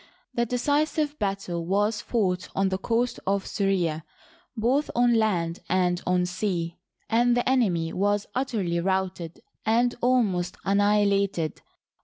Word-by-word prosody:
The 235 Hz, 0 st, 0 dB
decisive 290 Hz, +4 st, 0 dB
battle 195 Hz, -4 st, -2 dB
was 205 Hz, +4 st, 0 dB
fought 185 Hz, -6 st, -1 dB
on 195 Hz, 0 st, +2 dB
the 190 Hz, 0 st, -2 dB
coast 235 Hz, +4 st, 0 dB
of 195 Hz, 0 st, +1 dB
Syria, 180 Hz, -6 st, 0 dB, 0.5 s
both 255 Hz, +7 st, +1 dB
on 240 Hz, 0 st, +4 dB
land 180 Hz, -7 st, +1 dB
and 180 Hz, -1 st, +1 dB
on 180 Hz, 0 st, +2 dB
sea, 180 Hz, -2 st, -3 dB, 0.3 s
and 240 Hz, +2 st, +3 dB
the 245 Hz, -, 0 dB
enemy 185 Hz, -11 st, +1 dB
was 205 Hz, +2 st, +1 dB
utterly 210 Hz, -10 st, -1 dB
routed 185 Hz, -2 st, -2 dB, 0.2 s
and 240 Hz, +2 st, +2 dB
almost 220 Hz, -8 st, +1 dB
an 200 Hz, +1 st, +2 dB
nihilated. 200 Hz, -5 st, +1 dB
200 Hz, 130 wpm, -26 LUFS, 180-235 Hz, 0.5 s, on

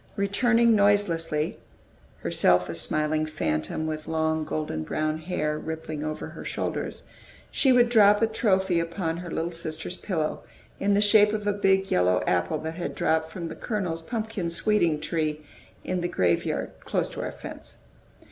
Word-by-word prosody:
Returning 230 Hz, +3 st, +3 dB
noiselessly, 170 Hz, -7 st, +1 dB, 0.6 s
herself 90 Hz, 0 st, +3 dB
a -, -, -3 dB
smiling 155 Hz, -, 0 dB
phantom, 80 Hz, -, -2 dB
with 155 Hz, -1 st, -4 dB
long, 160 Hz, 0 st, 0 dB
golden 150 Hz, -, -3 dB
brown 155 Hz, -, -1 dB
hair 155 Hz, -2 st, -2 dB
rippling 160 Hz, -1 st, -5 dB
over 155 Hz, 0 st, -4 dB
her -, -, -9 dB
shoulders, -, -, -3 dB, 0.5 s
she 270 Hz, -, +3 dB
would 245 Hz, -1 st, +5 dB
drop 210 Hz, -3 st, +6 dB
a 225 Hz, -, +4 dB
trophy 190 Hz, -5 st, +1 dB
upon 165 Hz, 0 st, -2 dB
her 175 Hz, 0 st, -7 dB
little 165 Hz, +1 st, -2 dB
sisters' 165 Hz, +2 st, -5 dB
pillow, 160 Hz, -6 st, -2 dB, 0.4 s
in 200 Hz, 0 st, +2 dB
the 205 Hz, -, +3 dB
shape 210 Hz, 0 st, +5 dB
of 210 Hz, -1 st, -2 dB
a 205 Hz, -, +2 dB
big, 195 Hz, -1 st, +2 dB
yellow 90 Hz, 0 st, +3 dB
apple 90 Hz, -1 st, +1 dB
that 160 Hz, +1 st, -5 dB
had 175 Hz, -, -4 dB
dropped 160 Hz, 0 st, +1 dB
from 170 Hz, -1 st, -5 dB
"the -, -, -7 dB
Colonel's" 185 Hz, -7 st, -3 dB
"pumpkin 215 Hz, -2 st, -3 dB
sweeting" 170 Hz, -3 st, +2 dB
tree 155 Hz, -1 st, -2 dB, 0.4 s
into 180 Hz, -1 st, -2 dB
the 175 Hz, -, 0 dB
graveyard, 90 Hz, -, 0 dB
close -, -, -1 dB
to -, -, -5 dB
our -, -, -3 dB
fence. -, -, -9 dB
165 Hz, 160 wpm, -26 LUFS, 155-205 Hz, 0.6 s, drop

